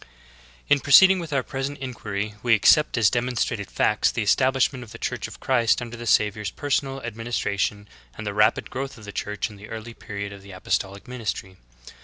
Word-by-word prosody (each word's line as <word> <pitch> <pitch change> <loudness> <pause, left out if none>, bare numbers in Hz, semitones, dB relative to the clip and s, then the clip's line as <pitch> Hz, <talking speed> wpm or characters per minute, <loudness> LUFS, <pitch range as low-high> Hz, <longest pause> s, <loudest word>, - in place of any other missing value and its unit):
1. - - -17 0.6
In 145 - +5
proceeding 185 +8 +7
with 165 -2 -6
our 135 -2 +1
present 135 +3 -4
inquiry 105 -6 -4
we 120 -1 +4
accept 150 +7 +4
as 110 -4 +4
demonstrated 120 -5 -1
facts 105 - +2
the 115 - -2
estabHshment 130 +4 +2
of 120 -3 -11
the - - -8
Church - - -3
of - - -12
Christ 120 -3 +2
under 120 -1 -6
the 120 0 -7
Savior's 105 -1 +2
personal 135 -2 -2
administration 105 -3 -2 0.3
and 110 - -6
the 105 - -3
rapid 105 +1 +2
growth 135 0 -5
of 110 - -12
the 100 - -7
Church 105 +2 -3
in 105 - -13
the 105 +1 -12
early 115 +1 -7
period 100 -2 -6
of 100 - -11
the 100 0 -12
apostolic 95 +2 -3
ministry. 110 -6 -5
115 Hz, 195 wpm, -24 LUFS, 105-130 Hz, 0.6 s, proceeding